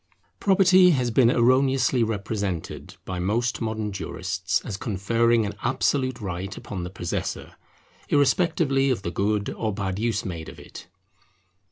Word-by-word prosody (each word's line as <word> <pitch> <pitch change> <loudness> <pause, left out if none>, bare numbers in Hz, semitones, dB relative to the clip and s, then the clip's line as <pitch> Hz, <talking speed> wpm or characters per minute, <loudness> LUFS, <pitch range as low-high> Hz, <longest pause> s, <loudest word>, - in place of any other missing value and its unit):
Property 190 -2 +5
has 125 -2 0
been 120 0 +5
erroneously 130 +1 +3
represented 100 -5 -3
by 95 -1 -4
most 115 +8 -1
modern 110 -2 -2
jurists 95 0 -2
as 105 - -5
conferring 115 +3 +1
an 100 - -4
absolute 130 0 0
right 95 -1 -5
upon 95 -3 -6
the 90 - -5
possessor, 90 -2 -4 0.6
irrespectively 145 -2 +2
of 120 -7 -1
the 85 - -3
good 100 +2 0
or 110 -1 -2
bad 95 -2 -3
use 115 0 -1
made 85 -4 -5
of - - -12
it. - - -11
110 Hz, 140 wpm, -25 LUFS, 95-130 Hz, 0.6 s, Property